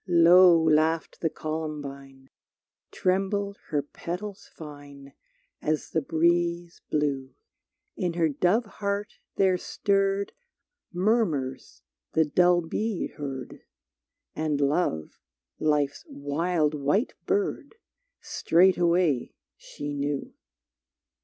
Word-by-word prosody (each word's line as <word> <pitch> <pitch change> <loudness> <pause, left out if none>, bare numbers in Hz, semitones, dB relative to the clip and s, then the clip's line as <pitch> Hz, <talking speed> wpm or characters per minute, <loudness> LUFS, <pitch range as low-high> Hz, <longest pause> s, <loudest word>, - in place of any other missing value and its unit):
Low 175 0 +7
laughed 160 0 +1
the 160 - +1
Columbine, 140 -4 -6 0.6
Trembled 200 +2 -1
her 145 -2 0
petals 190 +7 -7
fine 145 -2 -11 0.5
As 155 0 -2
the 160 - +1
breeze 170 +2 0
blew; 140 -3 -1 0.6
In 175 -2 -1
her 165 -1 +2
dove 180 - +1
heart 205 0 -4 0.2
there 185 -2 +3
stirred 195 +1 0 0.6
Murmurs 175 - -1 0.3
the 160 - +4
dull 175 +3 +4
bee 205 +5 -2
heard, 135 -3 -7 0.7
And 155 -2 -1
Love, 140 - 0 0.4
Life's 145 -2 +1
wild 150 +2 -1
white 150 - 0
bird, 400 +2 -1 0.5
Straightway 175 -5 +2 0.2
she 145 0 -7
knew. 145 0 -3
160 Hz, 90 wpm, -27 LUFS, 145-185 Hz, 0.7 s, Low